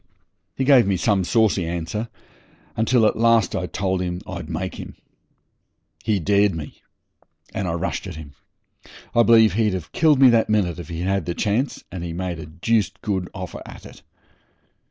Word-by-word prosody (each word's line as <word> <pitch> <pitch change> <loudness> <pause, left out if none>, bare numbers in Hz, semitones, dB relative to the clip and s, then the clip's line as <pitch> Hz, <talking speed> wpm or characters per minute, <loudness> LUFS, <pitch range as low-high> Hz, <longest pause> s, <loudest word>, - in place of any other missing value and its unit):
He 135 - -1
gave 130 -5 +5
me 95 -2 +1
some 95 +1 +1
saucy 105 -1 +2
answer, 85 +7 -4 0.7
until 115 +1 +3
at - - +2
last 115 -3 +3
I 90 -1 -2
told 95 -1 -2
him 90 -1 -3
I'd 85 -4 -7
make 90 +2 -3
him. - - -9 1.1
He 105 -3 +1
dared 100 +1 +2
me, 75 -2 -8 0.7
and 95 - -2
I 85 - -1
rushed 90 +3 -3
at 90 - -7
him. 75 -3 -10 0.8
I 120 - +5
believe 115 -4 +5
he'd 105 -2 +1
have 85 -4 -7
killed 155 -4 +3
me 130 -2 +7
that 115 -2 +2
minute 90 -6 +1
if 85 - -8
he'd 85 0 -5
had 95 -1 -1
the 85 - -2
chance, 110 +7 -1
and 90 -2 -6
he 85 -1 -5
made 90 -1 -4
a 80 - -8
deuced 95 +4 -1
good 95 -4 -2
offer 95 -2 -7
at - - -12
it. - - -13
95 Hz, 180 wpm, -22 LUFS, 85-110 Hz, 1.1 s, me